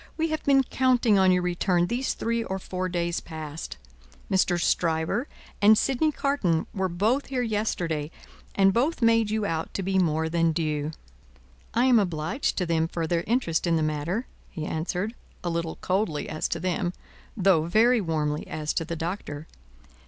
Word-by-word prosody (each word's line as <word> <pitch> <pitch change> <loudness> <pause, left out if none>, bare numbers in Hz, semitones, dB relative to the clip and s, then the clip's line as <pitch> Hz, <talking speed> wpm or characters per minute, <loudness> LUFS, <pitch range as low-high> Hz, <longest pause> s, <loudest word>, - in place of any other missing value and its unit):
We 325 0 0
have 310 - -2
been 275 -1 +5
counting 245 -5 +3
on 190 -1 +5
your 180 -1 +2
return 180 0 +1
these 245 +7 -1
three 230 0 -1
or 190 -3 -3
four 185 -1 -4
days 170 -1 -1
past. 155 -1 -7 0.5
Mr. 185 -2 +2
Stryver 170 - +1 0.3
and 210 +1 +7
Sydney 275 +6 +2
Carton 275 - 0
were 190 -1 -1
both 215 +11 +1
here 255 -2 -1
yesterday, 175 -9 -1 0.5
and 195 -1 +4
both 255 - +1
made 230 -1 +4
you 215 -1 0
out 165 -4 -2
to 195 - -1
be 190 +1 +1
more 160 -2 +1
than 165 0 +1
due." 155 -2 -1 0.9
"I 240 +2 +4
am 250 -3 +6
obliged 175 - -1
to 180 - +1
them 165 -1 +1
for 165 0 -3
their 170 +1 0
interest 200 -8 +1
in 170 - +3
the 160 - +1
matter," 155 - -1 0.2
he 155 - -5
answered, 180 +8 -2 0.3
a 175 - -1
little 165 -1 -2
coldly 185 -5 -1
as 155 - -2
to 170 - -3
them, 175 0 -1 0.4
though 185 -5 +4
very 225 +7 +4
warmly 150 -4 -1
as 155 -1 -3
to - - 0
the 170 - -4
Doctor. 165 -3 -5
180 Hz, 175 wpm, -26 LUFS, 160-220 Hz, 0.9 s, and